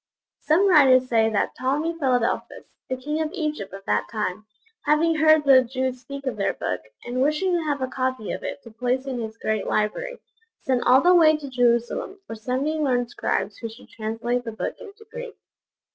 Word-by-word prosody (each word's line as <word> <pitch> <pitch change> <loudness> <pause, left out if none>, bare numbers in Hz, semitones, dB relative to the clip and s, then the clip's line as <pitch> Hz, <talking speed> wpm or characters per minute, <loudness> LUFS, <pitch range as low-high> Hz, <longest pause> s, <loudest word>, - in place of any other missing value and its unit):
Some 345 +6 +3
writers 265 -7 +6
say 225 -2 +3
that 215 - 0
Ptolemy 295 +6 -1
Philadelphus, 250 -5 0 0.2
the 260 - -2
king 300 +5 -3
of 310 - -1
Egypt 305 - -3
of 195 0 -10
that - - 0
time, 215 -1 -3 0.4
having 320 +2 +3
heard 310 -1 +5
the 265 -2 +7
Jews 255 0 -3
speak 275 +2 -8
of 250 -5 -2
their 200 - 0
Book, 90 0 -3 0.2
and 245 +1 -2
wishing 305 +7 +1
to 345 -2 +1
have 285 -3 -1
a - - 0
copy 255 -4 -2
of - - -4
it 285 - -5
to 230 - -12
place 250 +3 -1
in 260 -3 -3
his 220 -1 -6
great 215 -2 -2
library, - - -1 0.5
sent 255 -2 +1
all 255 +2 +7
the 355 +1 +5
way 315 -3 +6
to 295 -2 -8
Jerusalem 245 - 0
for - - -7
seventy 260 +8 -2
learned 245 -5 0
scribes 205 -3 -2
who 230 - -5
should 225 +3 -15
translate 230 +3 -3
the 225 -2 -6
Book - - -3
into 440 -1 -13
Greek. 485 -1 -7
260 Hz, 195 wpm, -24 LUFS, 235-305 Hz, 0.5 s, the